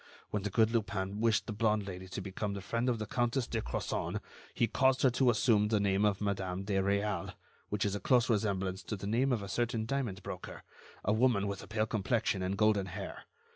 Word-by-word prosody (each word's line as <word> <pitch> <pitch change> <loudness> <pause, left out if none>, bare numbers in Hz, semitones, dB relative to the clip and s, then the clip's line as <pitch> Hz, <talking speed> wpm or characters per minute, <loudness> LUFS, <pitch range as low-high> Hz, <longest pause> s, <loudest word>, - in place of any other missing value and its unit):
When 105 - -1
the 105 - -2
good 110 +2 +3
Lupin 100 -3 -1
wished 115 -2 +3
the 110 - -4
blonde 105 -1 +1
Lady 95 -1 -7
to 95 +1 -5
become 100 +1 -3
the 100 - -5
friend 115 +5 -1
of 120 - +1
the 110 - -3
Countess 120 +2 0
de 115 -1 -2
Crozon, - - -2 0.3
he - - +2
caused 130 +3 +2
her 130 - +6
to 125 +1 +3
assume 110 -2 +3
the 105 -1 +2
name 100 0 +2
of 100 -1 +1
Madame 95 -2 -2
de 100 +1 -3
Réal, 100 -1 -1 0.3
which 105 0 0
is 100 - 0
a 100 - -2
close 125 0 +3
resemblance 95 -4 0
to 100 +4 -4
the 100 - -7
name 120 +6 +2
of 115 -5 0
a - - -5
certain 115 +2 -1
diamond 115 -7 -2
broker, - - -7 0.4
a 105 - +3
woman 110 -3 +3
with 100 -1 -3
a - - -11
pale 110 0 0
complexion 110 -2 0
and 95 +2 -1
golden 105 -2 +3
hair. 90 - -7
105 Hz, 220 wpm, -32 LUFS, 100-115 Hz, 0.4 s, her